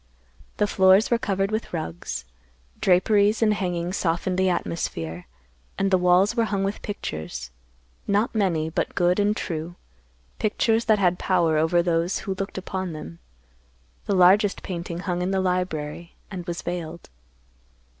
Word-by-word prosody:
The 210 - +3
floors 190 +2 +4
were 235 - +3
covered 195 -4 -1
with 220 +1 -3
rugs. 85 - -4 0.5
Draperies 205 +4 +3
and 215 -1 +4
hangings 180 -2 -2
softened 175 +2 0
the 190 0 +3
atmosphere; 85 - -3 0.5
and 195 0 +1
the 185 - +5
walls 180 +5 +4
were 230 -2 +2
hung 200 -3 -1
with 195 +2 -2
pictures; 80 - -5 0.6
not 205 +4 +1
many, 180 -8 +1
but - - -2
good 180 +2 +2
and 205 +1 +2
true; 165 -1 -4 0.6
pictures 225 +2 +1
that 215 -1 +4
had 180 -3 +2
power 170 -4 +2
over 170 +2 +3
those 170 +1 +1
who 195 - -1
looked 195 +1 -5
upon 190 -2 -4
them. 85 - -9 0.9
The 200 - +1
largest 190 +3 +4
painting 175 -1 -5
hung 180 -2 -2
in 180 - -1
the 190 0 +1
library 175 -3 -2 0.2
and 180 -2 -6
was 170 -1 -4
veiled. 170 - -5
180 Hz, 150 wpm, -24 LUFS, 170-200 Hz, 0.9 s, the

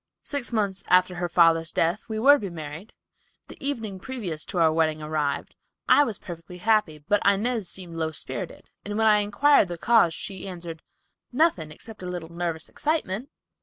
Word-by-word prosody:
Six 285 -5 -2
months 200 -4 -1
after 180 0 +4
her 175 0 -3
father's 165 -1 +4
death 170 +8 0
we 220 - -3
were 270 +6 +7
to 290 - +3
be 200 - -4
married. 160 +4 -8 0.5
The - - -12
evening 225 -9 -2
previous 195 - -4
to 190 - -6
our 160 -2 +4
wedding 155 -1 +1
arrived. 150 -2 -2 0.3
I 290 - +7
was 225 -6 -4
perfectly 175 0 -9
happy, 210 -5 +2
but 205 0 +3
Inez 210 0 +1
seemed 175 -3 -7
low 160 -1 -1
spirited, 160 - -7
and 205 +1 -4
when 220 - +2
I 210 -1 +6
inquired 210 +4 +4
the 175 -1 -5
cause 220 -4 +4
she 195 -1 -5
answered, 170 -3 -7 0.5
'Nothing, 255 - +2
except 210 +8 -12
a 180 - -5
little 175 -2 -5
nervous 170 -2 -3
excitement. 275 -6 -2
185 Hz, 180 wpm, -25 LUFS, 165-220 Hz, 0.5 s, were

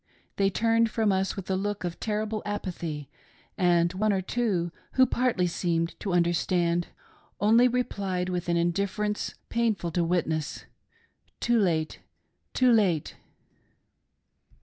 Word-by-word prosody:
They 195 -1 +3
turned 230 +3 +2
from 220 -1 +1
us 190 0 0
with 195 -2 -6
a - - +2
look 205 +1 -2
of 175 -1 -4
terrible 215 0 -2
apathy; 170 -8 -4 0.5
and 175 -2 +3
one 210 +3 +1
or 190 -1 0
two, 190 -6 -1 0.2
who 260 - +6
partly 240 -7 +1
seemed 170 -1 -1
to 195 - -3
understand, 175 0 +1 0.5
only 230 +4 +5
replied 200 -7 -1
with 180 -1 -3
an 170 - +2
indifference 200 +4 -1
pain 235 -2 +1
ful 170 -2 -5
to 175 +1 +1
witness 165 -3 -1 0.3
— - - -36
" - - -41
too 240 -1 +2
late, 160 -6 0 0.6
too 255 -1 +4
late 190 -9 +2
190 Hz, 140 wpm, -27 LUFS, 175-215 Hz, 0.6 s, who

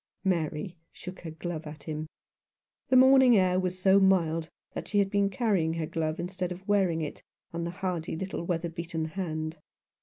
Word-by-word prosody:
Mary 170 -2 -1
shook 185 +1 -9
her 165 - -7
glove 160 0 -5
at 150 -1 -9
him. 155 0 -4 0.8
The 260 - +4
morning 260 -2 +7
air 185 -1 +3
was 185 0 -1
so 190 +1 +5
mild 165 -4 +2 0.2
that - - -5
she 205 - -1
had 195 -1 +3
been 200 -1 +2
carrying 195 -7 +1
her 165 -1 -1
glove 160 0 -2
instead 180 +1 -3
of 185 +3 -8
wearing 190 -5 +2
it 150 - -5 0.3
on 170 0 -2
the - - -2
hardy 180 -3 -3
little 190 0 -4
weather 170 -1 -1
beaten 165 -1 -4
hand. 155 -2 -4
175 Hz, 180 wpm, -29 LUFS, 160-190 Hz, 0.8 s, morning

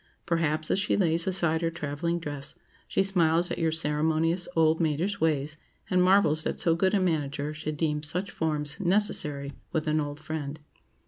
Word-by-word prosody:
Perhaps, 160 -2 0
as - - +2
she 200 - +1
lays 165 -3 +2
aside 170 -4 +3
her 165 - +1
travelling 165 +1 -3
dress, 145 -4 -6 0.3
she 195 - +1
smiles 175 -3 +2
at - - -3
your 165 -1 +1
"ceremonious, 160 +2 0
old 160 0 +3
maidish 165 +6 0
ways," 150 -1 0 0.3
and 180 0 +4
marvels 180 -5 +5
that - - -2
so 170 -3 +3
good 190 +4 +2
a - - +3
manager 150 -4 -1
should 155 0 -5
deem 150 -1 0
such 180 +6 -4
forms 150 -2 -2
necessary 170 -7 0 0.2
with 160 -4 -1
an 155 0 +2
old 145 0 -5
friend. 155 -2 -5
160 Hz, 175 wpm, -27 LUFS, 150-175 Hz, 0.3 s, marvels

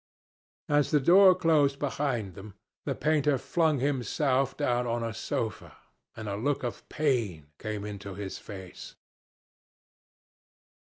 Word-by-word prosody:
As 145 -1 +2
the 150 - +4
door 185 +6 +7
closed 150 -6 +3
behind 130 -8 -2
them, 100 +2 -11 0.3
the - - -1
painter 150 -2 +2
flung 160 0 +1
himself 135 0 0
down 125 -4 0
on 115 0 -1
a 115 -1 -3
sofa, 110 0 -4 0.4
and 110 -1 -6
a 100 - -2
look 135 +7 -1
of 120 - -5
pain 110 - -1
came 105 -1 -4
into 100 -2 -7
his 100 -1 -6
face. 95 -3 -10
125 Hz, 125 wpm, -28 LUFS, 105-145 Hz, 0.4 s, door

